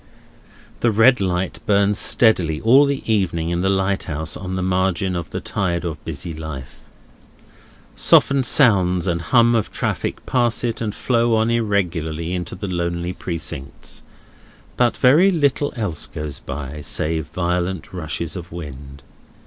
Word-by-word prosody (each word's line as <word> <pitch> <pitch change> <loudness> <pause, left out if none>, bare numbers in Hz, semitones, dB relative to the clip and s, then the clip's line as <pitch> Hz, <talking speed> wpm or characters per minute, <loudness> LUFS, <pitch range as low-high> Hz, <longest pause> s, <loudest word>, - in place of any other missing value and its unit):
The 120 - +2
red 115 +2 +5
light 90 -1 -1
burns 100 0 +3
steadily 90 -9 +3
all 130 +6 +6
the 140 -1 -2
evening 90 -7 0
in 85 0 -1
the 95 - +1
lighthouse 95 -5 -1
on 95 0 -5
the 95 - -2
margin 95 0 0
of 85 -3 -4
the - - -4
tide 90 -3 -2
of 80 -3 -5
busy 80 +2 -5
life. 80 -4 -8 1.2
Softened 135 -2 +4
sounds 95 - +4
and 85 -2 -1
hum 120 +4 +4
of 115 -3 0
traffic - - -3
pass 120 -3 +1
it 115 -2 -2
and 105 -2 -2
flow 120 -2 +1
on 110 +1 +2
irregularly 90 -7 -1
into 90 -1 -4
the 100 +2 -5
lonely 85 0 -2
Precincts; 80 -7 -6 0.7
but 120 -2 +2
very 155 +10 +5
little 145 -4 +1
else 100 -10 -3
goes 75 -2 -6
by, 70 +1 -6
save 80 +2 -2
violent 90 0 -2
rushes 85 -2 -4
of 90 -1 -8
wind. 70 -4 -9
90 Hz, 145 wpm, -21 LUFS, 85-110 Hz, 1.2 s, all